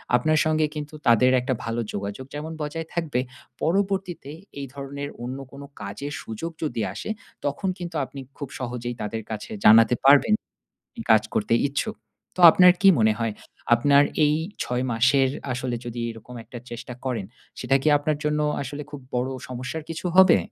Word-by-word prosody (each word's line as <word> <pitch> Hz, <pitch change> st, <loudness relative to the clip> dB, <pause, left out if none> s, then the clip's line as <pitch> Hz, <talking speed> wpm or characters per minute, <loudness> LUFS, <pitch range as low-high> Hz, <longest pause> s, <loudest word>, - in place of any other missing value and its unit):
আপনার 155 Hz, +6 st, +3 dB
সঙ্গে 155 Hz, 0 st, +2 dB
কিন্তু 150 Hz, 0 st, -6 dB
তাদের 120 Hz, +2 st, +5 dB
একটা 130 Hz, +1 st, -1 dB
ভালো 115 Hz, +1 st, -2 dB
যোগাযোগ 100 Hz, +5 st, -5 dB
যেমন 155 Hz, +2 st, -5 dB
বজায় 160 Hz, +2 st, -4 dB
থাকবে, 160 Hz, -7 st, -1 dB, 0.4 s
পরবর্তীতে 190 Hz, -3 st, -1 dB, 0.3 s
এই 140 Hz, -, -4 dB
ধরনের 140 Hz, 0 st, -6 dB
অন্য 130 Hz, +2 st, -4 dB
কোনো 140 Hz, +1 st, -10 dB, 0.2 s
কাজের 125 Hz, +9 st, -5 dB
সুযোগ 115 Hz, +10 st, -5 dB
যদি 145 Hz, -7 st, -2 dB
আসে, -, -, -6 dB, 0.4 s
তখন 145 Hz, +7 st, -1 dB
কিন্তু 175 Hz, -2 st, -7 dB
আপনি 140 Hz, -, -10 dB, 0.2 s
খুব 140 Hz, -3 st, -6 dB
সহজেই 120 Hz, -1 st, -4 dB
তাদের 110 Hz, +1 st, -4 dB
কাছে 105 Hz, -1 st, -6 dB
জানাতে 115 Hz, +2 st, +7 dB
পারবেন 145 Hz, +10 st, +6 dB, 0.6 s
আপনি 235 Hz, -, -9 dB
কাজ 110 Hz, -1 st, +4 dB
করতে 105 Hz, +2 st, +1 dB
ইচ্ছুক। 210 Hz, +11 st, -3 dB, 0.4 s
তো -, -, -9 dB
আপনার 180 Hz, +2 st, +7 dB
কী 195 Hz, -, +6 dB
মনে 110 Hz, -1 st, +4 dB
হয়? 115 Hz, -2 st, -1 dB, 0.4 s
আপনার 140 Hz, +4 st, +5 dB, 0.2 s
এই 150 Hz, 0 st, +3 dB, 0.3 s
৬ 125 Hz, +1 st, -1 dB
মাসের 130 Hz, +4 st, +3 dB, 0.2 s
আসলে 125 Hz, 0 st, -2 dB
যদি 120 Hz, 0 st, -5 dB
এরকম 115 Hz, +2 st, -10 dB
একটা 120 Hz, -, -10 dB
চেষ্টা 120 Hz, +1 st, -7 dB
করেন, 120 Hz, -7 st, -2 dB, 0.3 s
সেটা 135 Hz, -, +1 dB
কি 155 Hz, -, -1 dB
আপনার 145 Hz, +1 st, -1 dB
জন্য 150 Hz, 0 st, 0 dB, 0.2 s
আসলে 145 Hz, +2 st, -5 dB
খুব 145 Hz, -2 st, -8 dB
বড় 125 Hz, +1 st, 0 dB, 0.2 s
সমস্যার 130 Hz, +5 st, -5 dB
কিছু 165 Hz, +2 st, -5 dB
হবে? 190 Hz, -2 st, +8 dB
135 Hz, 165 wpm, -24 LUFS, 120-155 Hz, 0.6 s, হবে